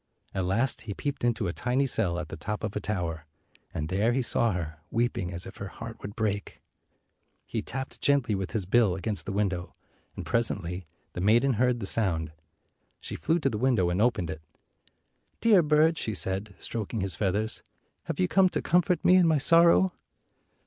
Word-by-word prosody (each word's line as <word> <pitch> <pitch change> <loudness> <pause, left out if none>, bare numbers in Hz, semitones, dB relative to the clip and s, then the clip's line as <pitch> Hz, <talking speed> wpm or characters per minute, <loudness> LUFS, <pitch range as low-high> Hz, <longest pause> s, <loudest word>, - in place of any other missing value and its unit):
At 95 -2 -1
last 115 +8 0
he 100 -3 -6
peeped 145 +3 -4
into 115 -4 +1
a 85 - -2
tiny 130 +6 0
cell 90 -9 0
at 90 -3 -5
the - - -6
top 105 +1 -5
of 105 -2 -3
a - - 0
tower, 85 -6 -3 0.4
and 75 - -3
there 100 +7 +1
he 130 0 +1
saw 115 -1 +3
her, 80 -3 -5
weeping 115 -6 -1
as 85 0 0
if 95 - -10
her 100 - -5
heart 115 +3 -9
would 100 +1 -7
break. 105 -2 -2 0.9
He - - -3
tapped 135 0 -5
gently 140 -6 +2
with 95 -2 -2
his 110 -5 -2
bill 100 -1 +3
against 100 +2 -4
the - - -2
window, 95 -3 -1 0.4
and - - -6
presently 95 -6 -1 0.3
the 90 - -4
maiden 120 +7 +4
heard 125 +2 +1
the 100 - -4
sound. 85 -8 +1 0.7
She - - -7
flew 165 - +1
to 135 - +2
the 105 - -3
window 115 -9 +2
and 90 +3 0
opened 110 -8 +1
it. 80 0 -7 1.0
"Dear 215 -5 +5
bird," 155 +1 +3
she 110 - -2
said, 95 +2 -1
stroking 110 -1 -4
his 95 -2 -1
feathers, 105 +4 -1 0.4
"have - - -4
you 90 - +3
come 190 - +4
to - - -2
comfort 180 +1 +2
me 185 - +7
in 180 -2 +5
my 160 -2 +4
sorrow?" 170 +5 +5
105 Hz, 190 wpm, -28 LUFS, 95-125 Hz, 1.0 s, me